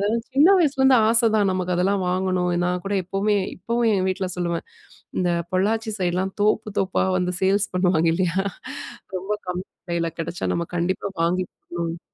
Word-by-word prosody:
அதெல்லாம் 220 +3 0
சின்ன 285 +6 +6
வயசுலேருந்து 270 -5 +4
ஆசதான் 220 -3 +3
நமக்கு 180 -1 -1
அதெல்லாம் 190 +2 +1
வாங்கணும். 185 -1 0 0.2
நான்கூட 180 +3 -2
எப்பமே 195 +3 0 0.2
இப்பவும் 235 +5 0
ஏன் 185 -2 +1
வீட்ல 190 0 -1
சொல்லுவேன், 170 -1 -2 0.5
இந்த 180 -1 +1 0.2
பொள்ளாச்சி 220 +4 +1
சைட்லாம் 185 +1 0
தோப்பு, 215 0 +2
தோப்பா 190 -1 +1
வந்து 180 0 -1
சேல்ஸ் 200 +2 +2
பண்ணுவாங்க 180 -3 +3
இல்லயா, 180 0 0 0.8
ரொம்ப 190 +3 -3
கம்மி 180 +1 -3 0.2
விலையில 170 -1 -1
கிடச்சா 165 +1 -3
நம்ம 170 - -1
கண்டிப்பா 185 +3 -1
வாங்கி 180 +2 +1
போடணும். 170 -1 -5
185 Hz, 150 wpm, -23 LUFS, 180-210 Hz, 0.8 s, சின்ன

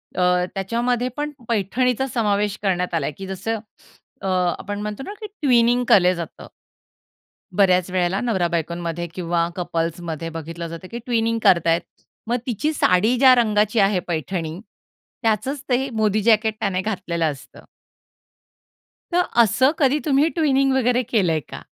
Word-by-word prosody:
अ, 180 - +1 0.3
त्याच्यामध्ये 240 +5 -1
पण 295 0 -2 0.2
पैठणीचा 245 +5 0
समावेश 210 -2 +1
करण्यात 180 -3 0
आला 160 -4 0
आहे, 150 - -3
की 195 - -7
जसं 195 +4 -3 0.6
अ, - - -4 0.3
आपण 205 0 -5
म्हणतो 210 +4 -5
ना 400 - -7
की - - -5
ट्विनिंग 245 - +2
केल्या 180 -2 +6
जातं. 170 -2 -8 1.1
बऱ्याच 185 -2 +3
वेळेला 185 +1 0
नवरा 195 -8 0
बायकोमध्ये 170 0 -3
किंवा 170 -1 0
कपल्समध्ये 165 -2 -3
बघितलं 165 +1 -6
जातं, 165 +3 -9
की 235 - -5
ट्विनिंग 230 -1 0
करतायेत. 170 -3 +4 0.5
मग 240 +2 +1
तिची 295 +7 -1
साडी 215 -1 +3
ज्या 260 -1 +7
रंगाची 215 -1 +2
आहे 195 -1 +3
पैठणी. 165 0 -3 0.6
त्याचचं 225 +3 0 0.2
ते 250 - +4
हे 275 - -4
मोदी 215 -3 +1
जॅकेट 220 0 +3
त्याने 185 -4 -1
घातलेलं 175 -5 -2
असतं. 135 - -13 1.5
तर 355 - +4 0.2
असं 250 +6 +3
कधी 285 +1 +3
तुम्ही 290 +2 +3
ट्विनिंग 275 -4 +2
वगैरे 250 -1 +2
केलंय 180 -8 +2
का? - - -9
205 Hz, 145 wpm, -22 LUFS, 175-245 Hz, 1.5 s, ज्या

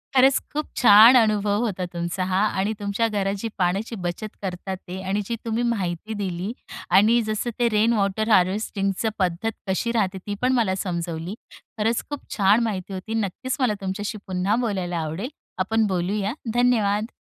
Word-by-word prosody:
खरंच 265 +1 +6
खूप 300 +1 -1
छान 225 +1 +8
अनुभव 210 -3 +3
होता 190 -4 -2
तुमचा 170 +2 -2
हां. 190 +3 +2
आणि 205 +3 0
तुमच्या 205 +3 0
घरात 200 -2 -1
जी 230 - -2
पाण्याची 195 +5 0
बचत 175 +5 -4
करतात 190 0 -4
आहेत 185 +1 -6
आणि 200 +2 0
जी 235 - -2
तुम्ही 230 +1 -1
माहिती 210 -3 -2
दिली. 190 -1 -3 0.4
आणि 225 +4 +5
जसं 215 +3 -1
ते 240 -1 +3
रेन 220 +2 +3
वॉटर 210 +1 0
हार्वेस्टिंगचं 195 +1 +1
पद्धत 185 +4 0 0.2
कशी 190 +5 0
राहते 200 -5 0
ती 205 - -2
पण 255 +1 +3
मला 220 -7 +2
समजवली, 170 -1 -4 0.4
खरंच 225 +2 0
खूप 290 -1 -7
छान 205 +4 +4
माहिती 195 -4 -3
होती. 190 +4 -5
नक्कीच 225 +4 -2
मला 250 -5 +2
तुमच्याशी 205 +3 -3
पुन्हा 185 +2 0
बोलायला 185 -5 -2
आवडेल, 165 +9 -3 0.3
आपण 220 +3 +2
बोलूया, 195 +3 -1 0.2
धन्यवाद. 225 -3 +2
205 Hz, 165 wpm, -24 LUFS, 185-225 Hz, 0.4 s, छान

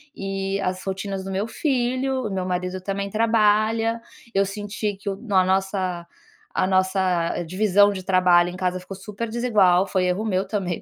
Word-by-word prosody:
e 195 0 -3
as 185 -1 -2
rotinas 195 0 -4
do 195 - -6
meu 195 +3 -1
filho, 255 0 -1
o 205 - -5
meu 185 -1 -2
marido 180 0 -3
também 200 +1 -3
trabalha, 225 +1 +2 0.3
eu 195 0 +3
senti 205 +1 -4
que 200 +1 -5
o 195 - -2
na 200 -5 +2
nossa 190 -2 -1 0.5
a 185 - +1
nossa 185 -3 +1
divisão 205 +3 +3
de 185 - -6
trabalho 180 -2 +4
em 180 - -8
casa 185 0 -1
ficou 185 +1 -9
super 210 +3 -6
desigual. 205 -6 +3
Foi 185 -1 0
erro 180 +4 0
meu 190 -2 0
também, 190 -4 -2
195 Hz, 170 wpm, -23 LUFS, 185-210 Hz, 0.5 s, trabalho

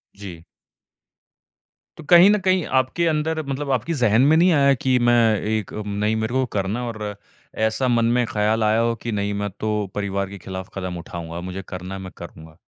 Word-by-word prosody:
जी। 95 -5 -10 1.5
तो - - -10
कहीं 175 +2 +8
न 210 - +4
कहीं 185 -2 +1 0.2
आपके 150 +7 -1
अंदर 160 0 0
मतलब 140 +1 -3
आपकी 130 +6 -1
ज़हन 115 0 +4
में - - +6
नहीं 180 +2 +5
आया 140 -2 +4
की 130 -1 +3
मैं 120 - +5 0.4
एक 110 -3 -3
म 105 -1 -5
नहीं 105 +1 +1
मेरे 110 +2 -2
को 130 0 +1
करना 100 +5 -1
है। 120 - -4
और 105 -2 -5 0.5
ऐसा 130 +4 -1
मन 120 -1 +2
में 125 - +2
ख़्याल 110 +1 0
आया 110 +1 +3
हो 115 0 +1
कि 120 - -3
नहीं 100 -1 -1
मैं 105 - -2
तो 110 - -1 0.2
परिवार 100 -1 -2
के 100 - -9
खिलाफ़ 95 -1 -6
कदम 90 -2 -4
उठाऊँगा 85 0 -7
मुझे 95 +2 -6
करना 90 +1 -6
है, 95 - -7
मैं 95 -1 -8
करूँगा? 80 -1 -12
110 Hz, 205 wpm, -22 LUFS, 95-130 Hz, 1.5 s, कहीं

